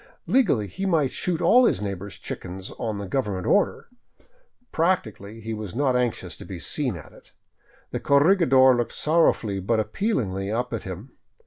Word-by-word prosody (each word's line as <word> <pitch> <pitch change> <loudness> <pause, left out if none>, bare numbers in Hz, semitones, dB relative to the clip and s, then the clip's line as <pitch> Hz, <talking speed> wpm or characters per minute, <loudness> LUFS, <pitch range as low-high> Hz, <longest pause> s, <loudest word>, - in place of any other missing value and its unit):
Legally 175 - +2
he 190 - -4
might 155 -7 +2
shoot 175 -3 -2
all 250 +1 +6
his 95 - +2
neighbors' 100 -1 -5
chickens 95 +1 -7
on 105 -4 -3
government 100 -6 -2
order; 205 - +1 0.9
practically 115 - -1
he 110 +1 -5
was 105 -4 -6
not 135 -1 +1
anxious 120 -8 -1
to - - -11
be 95 -3 -8
seen 130 - -1
at 85 - -11
it. - - -19 0.6
The - - -2
corregidor 140 -4 +5
looked 120 -2 -2
sorrowfully 150 -11 +2
but 110 +4 0
appealingly 105 - -1
up 120 +2 -2
at 115 - -2
him. 95 +7 -8
115 Hz, 155 wpm, -24 LUFS, 100-150 Hz, 0.9 s, all